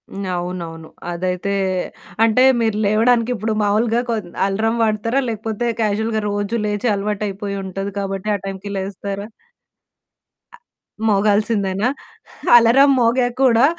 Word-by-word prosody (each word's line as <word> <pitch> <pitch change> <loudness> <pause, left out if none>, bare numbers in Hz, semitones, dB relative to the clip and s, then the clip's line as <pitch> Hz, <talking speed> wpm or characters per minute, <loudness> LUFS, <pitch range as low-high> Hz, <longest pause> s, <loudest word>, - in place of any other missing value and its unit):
హ్మ్. 195 0 -6
అవునవును. 170 -2 -5 0.2
అదైతే 180 +3 -2 0.7
అంటే 230 +3 +4 0.2
మీరు 220 -2 +1
లేవడానికి 230 +3 +3
ఇప్పుడు 220 +1 -2
మామూలుగా 225 +3 +2
కొద్ 215 -6 -2 0.2
అలరం 220 +4 0
వాడతారా? 225 +4 +1
లేకపోతే 220 +1 -3 0.2
క్యాజువల్‌గా 220 +1 0
రోజు 205 +2 -2
లేచి 210 +3 -1
అలవాటైపోయి 200 0 -3
ఉంటది 195 +1 -5
కాబట్టి 195 +1 -3
ఆ - - -1
టైంకి 195 +1 -6
లేస్తారా? 200 +1 -5 1.3
అ - - -21 0.5
మోగాల్సిందేనా? 205 0 +1 0.7
అలారం 250 +5 +5
మోగాక 245 +1 +2
కూడా 240 -1 +5
210 Hz, 115 wpm, -20 LUFS, 195-230 Hz, 1.3 s, అలారం